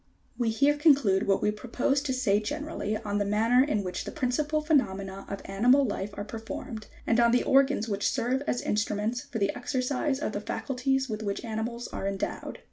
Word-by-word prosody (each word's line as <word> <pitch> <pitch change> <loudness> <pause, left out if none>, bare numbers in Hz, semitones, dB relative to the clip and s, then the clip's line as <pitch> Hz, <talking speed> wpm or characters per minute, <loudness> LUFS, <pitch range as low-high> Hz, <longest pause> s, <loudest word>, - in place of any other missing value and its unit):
We 240 -2 0
here 280 +6 +3
conclude 275 - +4
what 195 - +2
we 210 - +3
proposed 255 +6 -1
to 260 - 0
say 215 -6 +2
generally, 285 -3 -3
on 205 -2 -2
the - - +2
manner 225 +5 +3
in 215 -8 0
which 180 -1 -4
the - - -6
principal 300 +2 0
phenomena 195 - 0
of 200 - -5
animal 245 +8 +4
life 205 -3 -3
are 205 - -3
per 220 +2 -7
formed, 220 0 -7 0.2
and 230 - +2
on 235 0 +5
the 245 - +3
organs 270 -4 +3
which 200 -2 0
serve 255 +1 0
as 245 - 0
instruments 210 +3 -1
for 230 - -6
the 200 -2 +1
exereise 265 +2 -1
of 300 - -2
the 205 - -4
faculties 265 +3 -1
with 215 -2 -4
which 200 +2 -3
animals 230 +2 -3
are 195 - -4
endowed. 195 -1 -4
235 Hz, 200 wpm, -28 LUFS, 205-270 Hz, 0.2 s, on